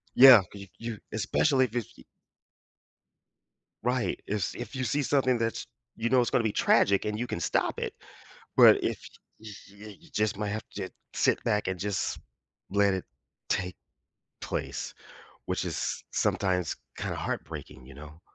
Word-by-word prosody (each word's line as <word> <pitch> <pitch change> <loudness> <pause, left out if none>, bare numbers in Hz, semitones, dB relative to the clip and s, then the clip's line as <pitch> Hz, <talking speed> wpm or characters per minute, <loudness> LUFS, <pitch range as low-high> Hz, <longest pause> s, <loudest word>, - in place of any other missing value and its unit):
Yeah, 130 -5 +10
c 100 - -10
you 100 - -9
you 115 -2 -5
especially 130 +6 +2
if 120 -1 -9
it's 120 -3 -3
y - - -15 1.8
Right, 125 0 0
if 105 - -1
s 95 - -2
if 120 +1 -7
you 130 - -1
see 140 +5 0
something 130 -2 +2
that's, 115 0 -2 0.3
you 115 +1 -1
know, 130 -1 +5
it's 120 - 0
gonna 120 - +2
be 110 -2 0
tragic 100 0 +3
and 105 0 -2
you 125 - -2
can - - -3
stop - - 0
it, - - -3 0.6
but - - +8
y - - 0 0.4
y 110 - -12 0.2
y 100 +2 -12
you 170 -1 -19
just 105 -4 0
might 105 -1 -2
have 110 +2 -4
to 95 -2 -4 0.3
sit - - +2
back 105 -3 0
and 95 -1 -2
just 100 0 -2 0.5
let 100 0 +3
it 95 - -3 0.4
take 90 -1 -1 0.7
place, - - -4 0.6
which - - -1
is - - -3
s - - -3
sometimes 90 -4 0 0.2
kind - - -3
of - - -5
heartbreaking, 65 - -5
you 70 - -12
know. 75 +4 -12
105 Hz, 175 wpm, -28 LUFS, 100-120 Hz, 1.8 s, Yeah